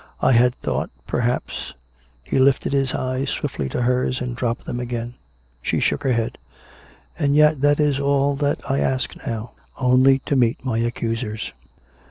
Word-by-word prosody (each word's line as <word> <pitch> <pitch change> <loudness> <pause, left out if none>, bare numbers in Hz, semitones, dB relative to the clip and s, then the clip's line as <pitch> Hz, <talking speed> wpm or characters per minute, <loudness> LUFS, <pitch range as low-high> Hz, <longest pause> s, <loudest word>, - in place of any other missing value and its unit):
I - - +3
had 125 +1 +4
thought - - -2 0.2
perhaps 120 +1 -2 0.2
" 65 0 -32
He 135 - 0
lifted 135 +1 +3
his 135 -2 +1
eyes 130 +1 -2
swiftly 75 - -3
to 125 - -1
hers, 125 +1 +1
and 125 -1 -4
dropped 120 -2 -2
them 120 - -4
again. 120 -1 -4 0.5
She - - 0
shook - - +1
her 130 - +1
head. 115 -1 -2 0.4
" - - -26
And 140 -2 +2
yet 150 -2 +5
that 145 +1 +3
is 145 -2 +2
all 140 0 +2
that 145 0 0
I 135 +1 +1
ask 130 -1 0
now 115 0 -4
— - - -34
only 130 +1 +5
to 140 - 0
meet 120 0 +1
my 115 -3 0
accusers. 115 -1 -2
125 Hz, 180 wpm, -22 LUFS, 120-135 Hz, 0.5 s, yet